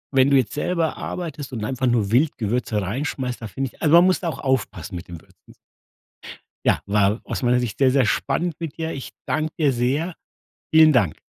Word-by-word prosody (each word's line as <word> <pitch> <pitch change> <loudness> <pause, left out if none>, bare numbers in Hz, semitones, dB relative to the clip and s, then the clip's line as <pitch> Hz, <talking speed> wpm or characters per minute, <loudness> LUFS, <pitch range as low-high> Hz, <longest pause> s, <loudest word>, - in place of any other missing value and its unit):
wenn 135 +1 +5
du 140 - +5
jetzt 130 -4 0
selber 165 +1 -1
arbeitest 155 -6 -6
und 110 -3 -3
einfach 130 +2 -1
nur 115 -5 +1
wild 140 +6 +2
Gewürze 115 -1 -1
rein 105 +9 -3
schmeißt, 130 -5 -4
da 115 - -5
finde 125 +6 -4
ich - - -24
also 155 0 +5
man 170 +1 +8
muss 185 0 +3
da 175 - -2
auch - - -6
aufpassen 105 - -2
mit 85 - -7
den 85 -2 -9
Würzen. - - -22 1.1
Ja, - - +3
war 105 +2 +2
aus - - -5
meiner 125 0 +3
Sicht 120 -4 -3
sehr, 135 -2 +4
sehr 135 -2 +3
spannend 160 +8 -1
mit 165 -3 -6
dir. 160 0 -3
Ich 135 - -6 0.2
danke 155 0 -1
dir 150 -4 +3
sehr. 140 +8 -1 0.6
Vielen 160 -1 +7
Dank. 105 - +2
130 Hz, 210 wpm, -22 LUFS, 115-155 Hz, 1.1 s, man